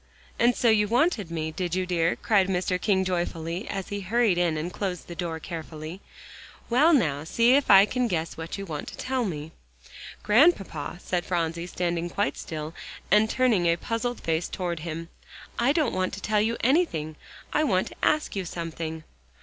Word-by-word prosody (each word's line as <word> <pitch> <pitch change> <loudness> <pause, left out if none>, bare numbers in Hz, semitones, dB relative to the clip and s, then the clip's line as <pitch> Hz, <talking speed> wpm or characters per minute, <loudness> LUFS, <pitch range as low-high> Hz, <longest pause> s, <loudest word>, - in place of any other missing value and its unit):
"And 240 0 +4
so 240 - +1
you 210 -1 +4
wanted 240 - +1
me, 160 -1 -3
did 175 +1 -3
you, 185 0 0
dear?" 170 -2 +1
cried 200 -5 +2
Mr. 180 -1 -1
King 190 -3 +2
joyfully, 175 +1 -2
as 195 -1 -4
he 205 0 -3
hurried 210 -1 +2
in 170 -3 +1
and 170 +3 -4
closed 185 -4 -3
the 175 - -7
door 170 -2 -4
carefully. 160 +1 -7 0.7
"Well, 295 +8 +5
now, 150 - +2
see 230 +9 +3
if 280 +1 +3
I 195 0 +9
can 250 +3 0
guess 165 -5 -2
what 165 +3 -6
you 195 - -5
want 155 -5 -5
to - - -8
tell 260 -1 -1
me." 155 -4 -5 0.7
"Grandpapa," 210 - +3
said 180 -1 -1
Phronsie, 170 -1 -2
standing 175 -1 -2
quite 200 +4 -1
still 155 -1 -6 0.4
and 210 +2 +5
turning 230 -10 +2
a 170 - +4
puzzled 230 +6 -3
face 165 +1 -1
toward 175 -3 -3
him, 165 +1 -6 0.5
"I 240 +3 +4
don't 300 -5 +1
want 185 0 -1
to - - -8
tell 210 +1 +1
you 230 +2 0
anything; 235 - +1 0.4
I 305 - +3
want 190 -11 +1
to - - -13
ask 305 -6 +1
you 195 - -1
something." 165 -2 -5
185 Hz, 185 wpm, -26 LUFS, 165-220 Hz, 0.7 s, I